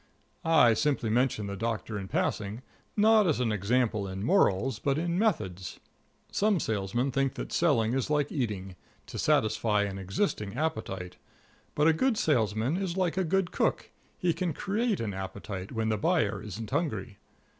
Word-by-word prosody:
I 160 -8 +5
simply 125 -2 0
mention 120 -3 +1
the 100 0 -4
Doctor 115 +1 -3
in 95 - -6
passing, 105 +5 -2 0.3
not 215 -1 +5
as 155 - +1
an 120 -3 +1
example 105 0 +1
in 95 +1 -5
morals, 120 - +2
but 140 +2 0
in 170 +2 0
methods. 95 - -1 0.5
Some 205 -2 +2
salesmen 110 +3 -1
think 135 0 0
that - - -6
selling 120 -9 +2
is 135 0 -1
like 150 -1 +1
eating 100 -8 -3 0.3
to - - -7
satisfy 105 -1 +2
an 100 -1 -4
existing 100 - -2
appetite; 105 - -3 0.6
but 150 +1 +3
a 165 - +6
good 240 +7 +1
salesman 115 - +1
is 190 -2 -2
like 185 -3 +1
a 190 - +1
good 185 +1 0
cook - - 0 0.3
he 175 -2 +1
can 180 -2 -2
create 210 +7 -1
an 110 -3 -2
appetite 95 0 -6
when 110 -2 -1
the 110 -1 0
buyer 100 -1 +1
isn't 110 +1 -7
hungry. 130 -10 -2
115 Hz, 165 wpm, -29 LUFS, 105-160 Hz, 0.6 s, a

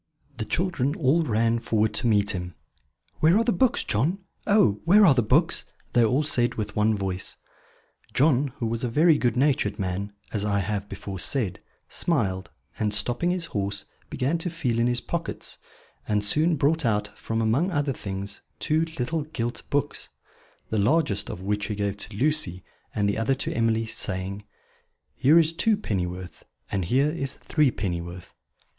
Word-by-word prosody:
The 110 - -3
children 150 - 0
all 160 -1 +3
ran 115 -4 +1
forward 110 -2 +1
to 125 - +3
meet 105 -2 +3
him. 90 -2 -5 0.6
"Where 165 +5 +5
are 230 - +3
the 235 - +2
books, 260 +1 +2
John? 140 - 0 0.3
Oh, 200 - +4
where 200 +5 +6
are 155 - +7
the 125 - +3
books?" 135 +10 +2 0.3
they 120 - +5
all 125 +7 +2
said 120 -5 +2
with 105 -1 -4
one 110 +1 +3
voice. 95 -1 -4 0.7
John, 140 0 +3
who 120 - -2
was 115 +1 -2
a 125 - 0
very 155 +5 +4
good 120 -1 +1
natured 130 -7 +2
man, 95 +2 -3 0.2
as 105 -2 0
I 105 -1 +1
have 100 +1 -2
before 95 -2 -6
said, 105 - 0 0.3
smiled, 100 - -1 0.3
and, 105 -1 0
stopping 120 +10 0
his 180 -2 -1
horse, 100 -5 -3 0.2
began 145 +7 -1
to 175 - -2
feel 140 -9 -1
in 120 - +3
his 120 0 +1
pockets; 170 -1 -4 0.5
and 105 -1 +1
soon 155 +9 +3
brought 155 +3 +2
out, 105 -3 0
from 115 0 -3
among 115 - +2
other 145 -5 0
things, 100 -2 -6 0.2
two 160 +1 +1
little 150 +6 -1
gilt 120 -6 -4
books; 145 0 -2 0.6
the 110 - +1
largest 105 -3 +2
of 90 - -6
which 105 +2 -1
he 105 - -3
gave 100 -1 -2
to 105 0 -7
Lucy, 135 - +1 0.3
and 100 -1 +1
the 100 - 0
other 125 +4 +1
to 135 - -3
Emily, 115 -1 +1
saying: 100 -2 -3 0.7
"Here 145 +5 +4
is 165 -1 +4
two 215 +5 +2
pennyworth 90 - -4 0.3
and 95 -3 -1
here 135 - +2
is 140 -4 -4
three 150 -3 +2
pennyworth." 90 -4 -5
115 Hz, 175 wpm, -25 LUFS, 105-150 Hz, 0.7 s, are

